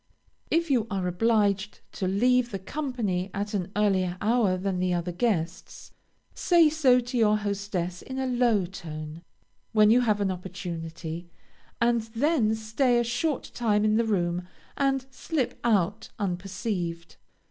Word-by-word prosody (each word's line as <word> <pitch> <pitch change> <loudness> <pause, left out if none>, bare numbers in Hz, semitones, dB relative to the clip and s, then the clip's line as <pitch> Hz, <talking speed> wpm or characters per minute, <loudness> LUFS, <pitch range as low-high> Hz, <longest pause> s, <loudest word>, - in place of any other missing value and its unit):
If 335 -2 +1
you 235 -4 +2
are 195 -2 -2
obliged 205 +1 +1
to 190 - -3
leave 245 +5 +3
the 195 - -4
company 210 -5 -3
at 205 +1 -3
an 190 -2 -2
earlier 190 -4 +1
hour 210 -3 +2
than 185 0 -2
the 180 -1 +1
other 175 +1 -2
guests, 175 -3 -2 0.4
say 340 -3 +4
so 270 -5 +4
to 245 +1 -4
your 215 -1 +4
hostess 200 -4 -3
in 260 - -7
a 265 - -1
low 240 -6 +2
tone, 155 -3 -8 0.5
when 215 -1 +6
you 245 +2 +5
have 215 -4 +2
an 200 -2 +1
opportunity, 170 -2 -6 0.5
and 235 0 +3
then 245 -4 +2
stay 225 +3 +1
a - - +2
short 260 +6 -2
time 215 -3 +1
in 215 0 +3
the 230 - +3
room, 180 -4 -1 0.3
and 270 -2 +1
slip 265 0 -2
out 210 -1 +1
unperceived. 180 -2 -3
210 Hz, 145 wpm, -27 LUFS, 180-240 Hz, 0.5 s, when